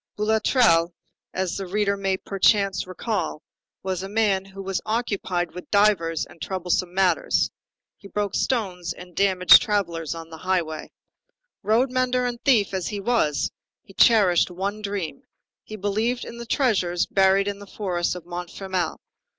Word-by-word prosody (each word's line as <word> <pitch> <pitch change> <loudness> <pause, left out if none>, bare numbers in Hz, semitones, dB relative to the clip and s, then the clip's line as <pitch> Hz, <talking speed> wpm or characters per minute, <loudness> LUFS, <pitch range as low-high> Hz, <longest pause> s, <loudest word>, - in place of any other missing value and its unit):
Boulatruelle, 210 -5 +3 0.4
as 185 -2 -2
the 195 -1 -5
reader 200 +1 0
may, 195 -1 -1
perchance, 195 -1 +1
recall, 185 -4 -3 0.4
was 185 -1 -2
a 195 - -6
man 205 -3 +1
who 195 0 -9
was 195 -1 -2
occupied 200 -6 -2
with 180 - -9
divers 200 -6 +2
and 165 - -18
troublesome 180 -1 -1
matters. 195 - +1 0.5
He 200 - -13
broke 205 -1 -2
stones 185 -8 -1
and 180 -1 -13
damaged 190 -2 +6
travellers 170 -7 -1
on 165 0 -9
the 160 - -9
highway. 170 -4 -2 0.7
Road 225 +6 +2
mender 255 -1 +1
and 240 -1 -4
thief 225 -9 +3
as 185 -2 -2
he 205 - -4
was, 195 - +1 0.3
he 195 - -17
cherished 200 -6 +4
one 200 +4 -4
dream; 200 -8 -4 0.4
he 215 - -9
believed 215 +5 -1
in 235 - -9
the 235 - -7
treasures 195 - +1
buried 195 0 +3
in 200 0 -3
the 205 - -11
forest 180 -4 -2
of 175 -2 -9
Montfermeil. 180 0 -4
195 Hz, 150 wpm, -24 LUFS, 180-210 Hz, 0.7 s, damaged